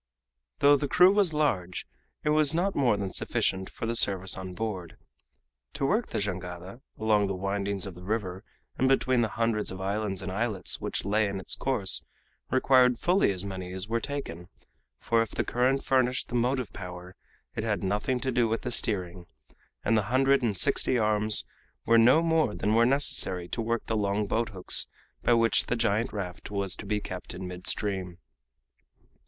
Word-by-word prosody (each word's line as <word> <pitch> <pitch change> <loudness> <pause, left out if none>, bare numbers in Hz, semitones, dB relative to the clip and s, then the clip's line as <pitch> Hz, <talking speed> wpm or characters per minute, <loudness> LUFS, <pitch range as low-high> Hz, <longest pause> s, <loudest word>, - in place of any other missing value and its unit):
Though 145 0 +6
the 145 - -2
crew 180 +6 +6
was 200 -5 +3
large, 100 - -1 0.4
it 150 - 0
was 150 0 +3
not 190 +3 +1
more 120 -7 +2
than 100 -2 -4
sufficient 95 0 -1
for - - -6
the 115 - -1
service 95 -4 +2
on 95 -1 -7
board. 95 -7 -5 0.8
To 135 - -2
work 215 - +1
the - - -4
jangada 95 +2 -5 0.2
along 105 -2 +2
the 95 - -2
windings 100 0 -2
of 95 - -7
the 90 - -13
river 95 -1 -3 0.4
and 130 - +3
between 130 -2 +2
the 115 - +2
hundreds 115 -2 0
of 95 - -7
islands 100 0 -2
and 95 - -4
islets 105 +1 -2
which - - -3
lay 105 +1 +2
in 100 0 -4
its 95 - -1
course 120 -8 +1 0.5
required 130 -1 +4
fully 180 - +2
as 95 0 -3
many 95 -2 -6
as 95 +2 -3
were 115 +1 0
taken, 115 - -6 0.5
for 115 -1 +1
if 115 - -2
the - - -2
current 130 +3 0
furnished 130 -1 +1
the - - -9
motive 125 0 0
power, 90 -1 -9 0.4
it 110 - -3
had 105 -5 -1
nothing 105 +7 -1
to 130 - -1
do 120 -1 +2
with 110 0 -1
the 125 - -4
steering, 90 -7 -2 0.6
and 115 - +3
the 110 -2 +1
hundred 135 +2 +3
and 110 -5 -1
sixty 125 - +2
arms 105 -1 +5 0.4
were 115 0 +5
no 130 +8 +5
more 160 -9 +1
than 105 +2 0
were 115 +1 +4
necessary 95 -10 +1
to 115 - -3
work 115 +1 -2
the 110 - -2
long 105 0 0
boathooks 110 -3 -1 0.3
by 120 - +3
which 115 0 +3
the - - 0
giant 115 0 0
raft 90 -5 -6
was 100 -2 -1
to 100 - -9
be 105 +1 0
kept 95 -3 -7
in 95 - -6
mid 90 0 -8
stream. 95 -4 -2
110 Hz, 185 wpm, -28 LUFS, 95-125 Hz, 0.8 s, Though